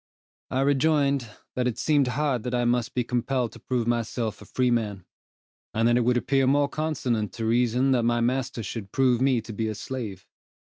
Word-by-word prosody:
I 130 - 0
rejoined, 140 -2 +2 0.2
that 125 -1 0
it 120 - -2
seemed 145 -4 +2
hard 130 -1 0
that 125 +2 -3
I 120 0 +1
must 120 -1 0
be 125 - +1
compelled 125 0 -1
to - - -13
prove 125 -3 -1
myself 115 -2 -2
a - - -11
freeman: 115 -7 0 0.7
and 115 +1 +3
that 120 - +4
it 125 - +3
would 125 +1 +2
appear 135 +1 +2
more 140 +1 +3
consonant 125 - -1
to 115 - -4
reason 125 +3 +2
that 125 -2 +3
my 120 0 +1
master 125 -1 -1
should 100 -1 -6
prove 130 -2 +2
me 130 -3 +3
to 110 - -9
be 110 +2 -2
a 110 - -3
slave. 110 -5 -6
125 Hz, 195 wpm, -26 LUFS, 115-130 Hz, 0.7 s, that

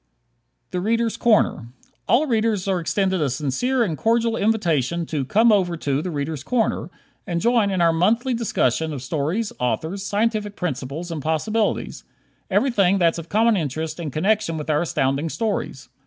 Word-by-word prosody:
"The 180 - -2
Readers' 230 +3 0
Corner" 215 - +2 0.4
All 240 +9 +4
Readers 220 -6 0
are 190 -2 +1
extended 190 +1 0
a 145 - +1
sincere 150 - 0
and 175 -8 -1
cordial 230 +4 +1
invitation 170 - 0
to 150 -3 -2
"come 225 - +4
over 180 -5 +2
to 140 -2 -1
'The 180 - -4
Readers' 145 -2 -4
Corner'" 240 +3 0 0.4
and 170 -1 -1
join 230 0 +2
in 190 -2 0
our 165 -1 +4
monthly 230 +10 +2
discussion 160 - 0
of 135 -3 -6
stories, 160 - -2
authors, 160 +10 -2
scientific 210 0 -1
principles 155 +1 -4
and 160 -3 -4
possibilities 205 +9 -1 0.5
everything 200 -8 +3
that's 170 -2 +2
of 165 0 -9
common 225 +2 +3
interest 160 -1 -3
in 165 -3 -3
connection 190 +3 0
with 155 0 -3
our 150 - +2
Astounding 140 -2 0
Stories. 220 +4 -3
180 Hz, 160 wpm, -22 LUFS, 155-220 Hz, 0.5 s, All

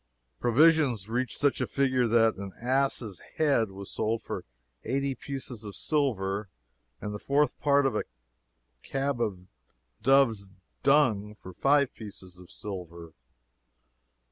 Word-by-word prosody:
Provisions 130 - +4
reached 125 +2 -1
such 145 -1 +2
a - - 0
figure 130 -3 +2
that 115 0 +4
"an 100 -1 -7
ass' 125 -5 0
head 140 -9 +2
was 95 0 -9
sold 110 +1 -1
for - - -5 0.4
eighty 135 +3 -1
pieces 130 -3 -5
of 105 -2 -7
silver 105 -9 0 0.5
and 105 - -5
the 105 - -5
fourth 140 +2 +1
part 140 -1 +3
of 135 - +1
a - - -1 0.8
cab 135 - -2
of 95 -5 -2 0.6
dove's 115 -5 +3 0.3
dung 115 -8 +3
for 95 -3 -11
five 140 +5 +3
pieces 95 -4 -10
of 90 -1 -14
silver." 85 -6 -8
115 Hz, 130 wpm, -28 LUFS, 100-140 Hz, 0.8 s, Provisions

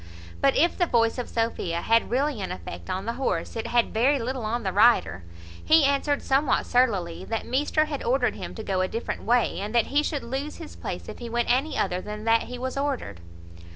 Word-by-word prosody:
But 275 -1 +4
if 340 +4 +3
the 350 - +1
voice 230 -1 +2
of 245 - -4
Sophia 205 -7 -1
had 230 0 +3
really 265 -1 0
an 190 - -4
effect 85 -1 -8
on 190 +2 -3
the 230 - -2
horse, - - -1
it 225 - -3
had 240 -1 +1
very 260 +6 +3
little 255 0 -3
on 235 +2 -2
the 190 -2 -2
rider. 190 - +4 0.4
He 315 -2 +5
answered 280 +1 +1
somewhat 270 0 +2
surlily, 190 -9 +1
"That 225 +3 -3
measter 295 +4 +1
had 295 -3 -5
ordered 250 +1 +1
him - - -7
to 220 - -6
go 190 -3 0
a 185 - +1
different 230 +5 -4
way, 240 -3 +2
and 210 +4 -4
that 235 - +4
he 290 - +5
should 295 -2 -3
lose 270 +5 -4
his 325 -3 -10
place - - -6
if - - -8
he 240 -1 -6
went 235 0 0
any 275 +5 0
other 180 +1 0
than 210 +1 -7
that 225 0 +2
he 250 - -5
was 260 +2 -4
ordered." 265 - -3
240 Hz, 220 wpm, -26 LUFS, 210-275 Hz, 0.4 s, He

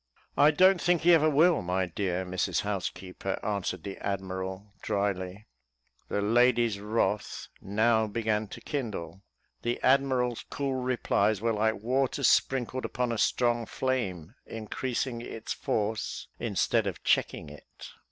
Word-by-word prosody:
"I 145 - +6
don't 185 +4 +5
think 175 -2 +2
he 175 +1 +7
ever 155 -1 +5
will, 160 +3 +4
my 90 +1 0
dear 90 +1 -2
Mrs 90 0 -1
Housekeeper," 95 -1 -4
answered 100 -4 -2
the 100 - -6
admiral, 95 0 -4
drily. 100 0 -2 0.6
The 100 - -1
lady's 120 -1 +3
wrath 105 0 -1
now 110 +2 +2
began 110 0 -1
to - - -10
kindle. 105 - -4 0.4
The 120 0 -1
admiral's 130 -3 +2
cool 140 -1 -2
replies 120 -5 +1
were 115 +1 0
like 110 +1 +1
water 130 +2 0
sprinkled 130 -1 +2
upon 125 -1 -1
a 115 - -2
strong 120 -2 +1
flame, 105 -10 -2
increasing 120 +2 -3
its 115 -1 -5
force, 110 +1 -2
instead - - +1
of - - -5
checking - - +1
it. 75 - -13
110 Hz, 130 wpm, -29 LUFS, 100-125 Hz, 0.6 s, he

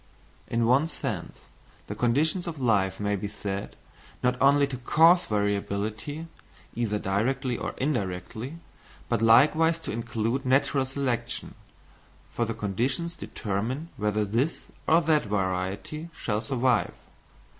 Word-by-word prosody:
In 115 0 +1
one 130 +7 +4
sense 130 - -4 0.4
the - - -5
conditions 145 - +1
of 160 -4 -5
life 100 -6 +2
may 105 0 0
be 100 +1 -3
said, 100 -1 -5 0.5
not 125 0 +3
only 140 +1 +5
to 135 -2 -5
cause 165 +7 +5
variability, 105 +7 -2 0.5
either 115 -3 -1
directly 120 +7 0
or - - -4
indirectly, 120 - -3 0.5
but 115 -2 +1
likewise 155 +9 +5
to - - -5
include 115 +3 -2
natural 135 0 +2
selection, 135 -3 -2 0.8
for 120 - 0
the 115 0 -3
conditions 125 - -1
determine 120 - -3
whether 105 0 0
this 120 +10 -1 0.2
or 165 +2 +5
that 155 -4 +2
variety 100 - -2
shall 105 -1 -1
survive. 125 -3 +1
120 Hz, 125 wpm, -27 LUFS, 105-140 Hz, 0.8 s, only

